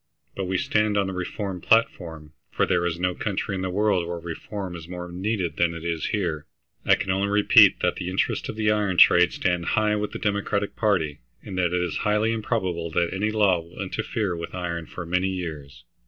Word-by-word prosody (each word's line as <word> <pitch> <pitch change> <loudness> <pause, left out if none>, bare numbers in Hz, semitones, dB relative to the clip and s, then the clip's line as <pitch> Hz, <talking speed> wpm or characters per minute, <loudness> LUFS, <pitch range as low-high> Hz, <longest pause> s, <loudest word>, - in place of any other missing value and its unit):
But 95 - -3
we 95 +1 -1
stand 105 +2 +1
on 100 - +2
the 95 - -4
reform 90 0 -4
platform, 80 -9 +1 0.2
for - - +1
there 85 0 +1
is 85 0 -3
no 90 0 0
country 100 0 -3
in 95 - -3
the 95 - -2
world 95 -2 +1
where 85 0 -4
reform 90 +3 -6
is 80 -1 -9
more 90 0 -7
needed 90 -3 -2
than 85 -1 +1
it 85 0 -8
is 85 -2 -2
here. 85 -7 -2 0.4
I - - +7
can 95 - -2
only 95 +2 +1
repeat 105 0 +6
that - - +1
the 90 - -4
interests 95 - -1
of - - -5
the 105 -1 +1
iron 105 -4 0
trade 85 0 +7
stand 90 -2 -1
high 105 -1 +3
with 105 0 -2
the - - -5
Democratic 100 0 -1
party, 80 -10 0 0.2
and 95 - -7
that 90 -1 +1
it 90 0 +1
is 85 -3 -2
highly 105 +2 +1
improbable 95 -7 -2
that 85 +2 0
any 100 +3 0
law 105 -5 +3
will 85 +1 -13
interfere 100 -1 -2
with 85 +2 -6
iron 85 -2 -4
for 85 - -7
many 90 +3 0
years. 75 -7 -6
90 Hz, 215 wpm, -25 LUFS, 85-105 Hz, 0.4 s, I